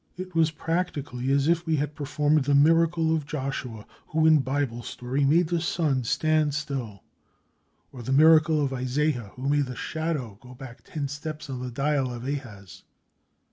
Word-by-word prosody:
It 185 0 -7
was 165 -1 +3
practically 150 -6 -3
as 140 +1 +2
if 170 0 +1
we 160 - +2
had 150 0 -2
performed 145 0 +1
the 140 0 +3
miracle 165 +2 +4
of 150 -3 -4
Joshua, 130 -7 -5 0.2
who 160 0 +1
in 155 -1 +6
Bible 135 -3 -2
story, 125 +4 -3
made 160 +4 +3
the 170 -1 0
sun 155 -6 0
stand 155 +2 +1
still, 130 -9 -4 0.9
or 125 - -9
the 120 - -4
miracle 155 +1 +5
of 135 - -3
Isaiah, 130 -3 -1
who 130 +2 -5
made 145 -1 +2
the 125 - -6
shadow 145 -7 -4
go 125 0 -13
back 125 -1 -11
ten 145 -3 -4
steps 150 +1 -6
on 130 - -4
the 125 - -4
dial 135 +1 0
of 120 0 -7
Ahaz. 115 - -6
145 Hz, 175 wpm, -26 LUFS, 130-155 Hz, 0.9 s, in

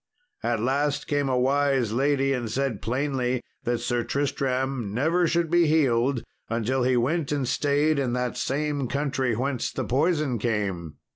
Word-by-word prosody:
At 115 -1 0
last 140 +5 0
came 145 -2 0
a 130 - +1
wise 135 -3 +2
lady, 135 +1 +2
and 120 -3 -2
said 135 -3 -1
plainly 130 0 -1 0.2
that 120 0 0
Sir 120 0 0
Tristram 130 -4 -1
never 165 +7 +2
should 170 -1 0
be 175 -1 +4
healed, 135 -5 +2 0.3
until 120 +3 0
he 125 0 +2
went 145 +5 0
and 140 -3 0
stayed 145 +3 +2
in 125 -3 0
that 125 -1 -1
same 145 -1 -1
country 135 -3 -1
whence 130 +1 -1
the - - -3
poison 145 -2 +1
came. 100 -8 -2
130 Hz, 155 wpm, -25 LUFS, 120-145 Hz, 0.3 s, be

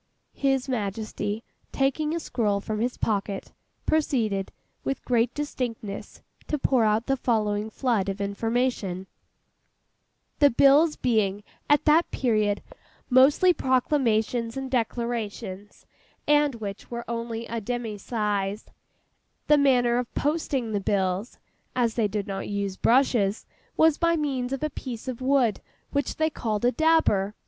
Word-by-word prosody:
His 270 -2 0
Majesty, 215 -2 -3 0.3
taking 300 +4 0
a - - -1
scroll 210 -9 0
from 215 +1 -4
his 245 +3 -1
pocket, 200 -2 -2 0.3
proceeded, 225 -11 0 0.3
with 270 - -3
great 240 -1 +2
distinctness, 240 -8 -5 0.2
to 300 - 0
pour 260 -3 +2
out 215 +2 +2
the 270 - +1
following 215 -4 0
flood 220 -5 0
of 195 +1 -4
information:— 200 -2 -1 1.3
'"The 285 - +7
bills 285 +5 +5
being 210 -4 0 0.3
at 290 +1 +4
that 315 +3 +4
period 215 -5 0 0.5
mostly 285 +8 +6
proclamations 245 -4 +1
and 265 -1 -4
declarations, 225 -5 -3 0.4
and 295 -2 +3
which 205 -3 -7
were 235 0 -5
only 230 0 -4
a 230 0 -4
demy 225 -1 -4
size, 205 -2 -2 0.8
the 300 - +5
manner 245 -3 +3
of 245 - -4
posting 285 -6 -1
the 205 -1 -1
bills 190 +2 -1 0.4
(as 240 -3 +1
they 225 -2 +1
did 205 0 -3
not 195 -2 -5
use 200 -2 -2
brushes) 230 -4 +2 0.3
was 320 -2 +4
by 335 -1 +3
means 270 -5 -2
of 270 +1 -3
a 305 - -1
piece 250 -3 -7
of 255 -1 -4
wood 255 -5 +2 0.3
which 285 0 -1
they 315 0 +1
called 220 -5 -2
a 245 - +4
'dabber. 285 -11 +2
235 Hz, 135 wpm, -26 LUFS, 210-270 Hz, 1.3 s, The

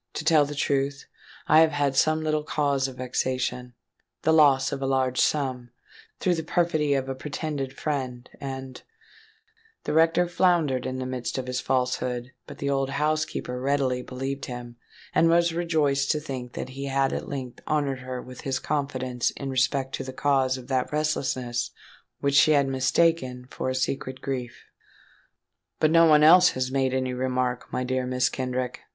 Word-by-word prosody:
To 150 - -4
tell 155 -2 +5
the 145 +1 -6
truth, 140 0 -1 0.4
I 155 - +6
have 160 -1 +5
had 145 -2 0
some 155 +3 +2
little 155 -1 0
cause 140 -3 0
of 130 - -9
vexation—the 125 +3 -3
loss 145 -4 +5
of 135 - -4
a 135 - -1
large 130 -1 +1
sum—through 130 +5 -2
the 165 - -2
perfidy 155 -3 +1
of 135 -1 -1
a 135 - -2
pretended 140 0 -4
friend—and——" 130 -1 -5 1.0
The - - -2
rector 165 +2 +4
floundered 170 -8 +2
in 130 0 -3
the 130 - -3
midst 125 -1 -4
of 130 - -3
his 125 0 -2
falsehood; 125 -1 -1 0.2
but - - -10
the 140 - -3
old 135 -1 0
housekeeper 150 -3 -1
readily 135 -2 +1
believed 135 +2 -5
him, 120 -1 -8 0.4
and 165 - +4
was 170 0 +3
rejoiced 155 -5 +1
to 150 - -2
think 130 -5 -6
that - - -5
he 135 +2 -6
had 135 0 +1
at - - -4
length 130 -3 -6
honoured 145 -3 0
her 130 -1 -6
with 125 -1 -10
his 135 -1 -1
confidence 130 -4 -1
in 135 -1 -6
respect 130 +1 0
to - - -3
the 130 - -6
cause 130 -1 +1
of 125 -1 -11
that 130 -2 -1
restlessness 130 -5 -1 0.5
which 140 0 +1
she 155 +2 +6
had 140 -2 +3
mistaken 130 -1 +1
for - - -3
a 130 - -2
secret 130 0 -2
grief. 125 -3 -5 1.1
"But 155 - +3
no 165 0 +6
one 150 -1 +6
else 180 +3 +8
has 130 0 -2
made 135 -1 +1
any 130 -1 -1
remark, 125 -1 -2
my 125 - -1
dear 130 0 -1
Mrs. 125 0 +1
Kenrick?" 125 -1 -3
135 Hz, 170 wpm, -26 LUFS, 130-150 Hz, 1.1 s, else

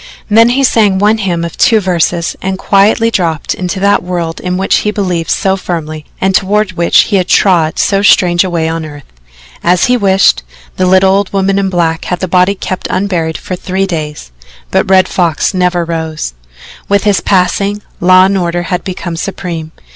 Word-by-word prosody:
Then 230 +2 +5
he 270 +3 +1
sang 210 -6 +2
one 210 +3 +2
hymn 175 -4 -2
of 170 - -7
two 225 -2 +3
verses 175 -3 -1
and 190 0 -3
quietly 210 +4 +2
dropped 165 -7 -1
into 185 +1 -4
that 200 +1 +2
world 175 -2 -4
in 180 0 -3
which 190 - +1
he 210 - -1
believed 180 -6 -2
so 190 0 +1
firmly 155 -5 -5
and 190 0 0
toward 205 +1 +1
which 170 -1 +3
he 205 - 0
had 185 -1 0
trod 170 -6 +2
so 195 -1 +1
strange 175 -3 +4
a 185 - -3
way 165 -2 -1
on 165 0 -3
earth. 145 -2 -10 0.6
As 175 0 +2
he 250 0 +2
wished, 195 -3 +3 0.3
the 185 - 0
little 190 +1 +4
old 200 0 0
woman 195 0 0
in 195 -1 0
black 170 -2 -1
had 180 - -3
the 185 - -2
body 180 +3 +2
kept 185 -1 -5
unburied 175 -4 -1
for 185 - -6
the - - -16
three 190 +1 -1
days 150 - -5 0.4
but - - +1
the - - -2
Red 185 -1 +5
Fox 170 -2 0
never 180 -2 0
rose. 160 - -4 0.6
With 200 0 +2
his 205 -2 +1
passing, 200 +2 0 0.2
law 185 +1 +5
and 195 +1 0
order 175 0 -2
had 180 - -2
become 180 -2 -5
supreme. 170 -3 -5
185 Hz, 195 wpm, -11 LUFS, 170-195 Hz, 0.6 s, Then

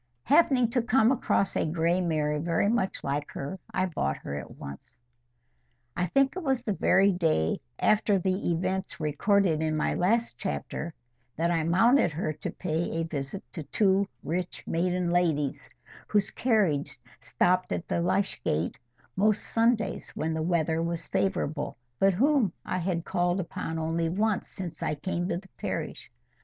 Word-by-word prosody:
Happening 275 -5 +4
to 250 0 +2
come 235 0 +4
across 225 -6 +1
a - - +2
gray 170 +3 +1
mare 150 -3 0
very 170 +4 +1
much 210 -3 0
like 145 +1 -2
her, 145 +8 -5
I 185 - +1
bought 70 - -1
her 70 - -6
at 70 - -6
once. 70 - -10 1.0
I 180 - 0
think 275 - +2
it 370 - -3
was 265 -6 0
the 215 - 0
very 195 +2 +4
day 160 - +1 0.2
after 215 -1 +3
the 185 +1 0
events 185 +3 -2
recorded 160 +2 +2
in 155 -1 0
my - - +1
last 230 +6 +1
chapter 75 - -4 0.4
that 170 +2 +1
I 165 -2 +1
mounted 225 - +4
her 155 0 -2
to 150 - -5
pay 165 -1 -2
a - - +1
visit 150 +3 -5
to 165 - -5
two 195 +6 +2 0.2
rich 175 +4 -3
maiden 180 +1 0
ladies, 160 -6 0 0.4
whose 205 -2 +1
carriage 200 - +1 0.2
stopped 185 +1 +1
at 175 - -2
the 170 - 0
Lych 180 -4 0
gate 80 +3 -1 0.4
most 210 +2 +2
Sundays 225 -3 +1
when 160 +1 -1
the 160 - -1
weather 165 -1 +1
was 170 0 -2
favourable, 155 -9 -1 0.2
but 195 -1 +4
whom 260 - +3
I 185 - -1
had 170 -2 -1
called 175 0 +1
upon 165 -2 -4
only 165 +1 0
once 205 +3 0
since 180 -4 -7
I 150 - 0
came 175 +4 -2
to 170 - 0
the 190 +1 -11
parish. - - -4
175 Hz, 165 wpm, -28 LUFS, 160-200 Hz, 1.0 s, Happening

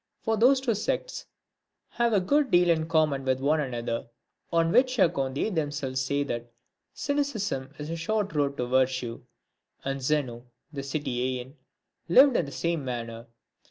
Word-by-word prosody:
For 225 - +1
those 255 +5 +5
two 255 -3 0
sects 215 - -3 0.6
have 235 0 +1
a 205 - +4
good 285 +9 +2
deal 175 0 +5
in 160 -1 0
common 155 -4 +2
with 130 -1 +1
one 150 +3 +2
another, 120 -3 -3 0.4
on 165 -1 +2
which 255 +4 +3
account 135 - +2
they 215 - 0
themselves 145 -6 -2
say 140 +2 0
that 120 -3 -5 0.4
cynicism 220 - -2
is 150 +2 -6
a - - -2
short 205 +4 -1
road 140 -2 0
to 125 - -1
virtue; 125 -2 0 0.6
and 135 0 -2
Zeno, 130 -4 -1 0.3
the 140 - -4
Cittisean 130 -2 -3 0.6
lived 260 +8 +7
in 170 - +2
the - - -8
same 160 +4 -1
manner. 115 -2 -5
145 Hz, 160 wpm, -27 LUFS, 130-190 Hz, 0.6 s, lived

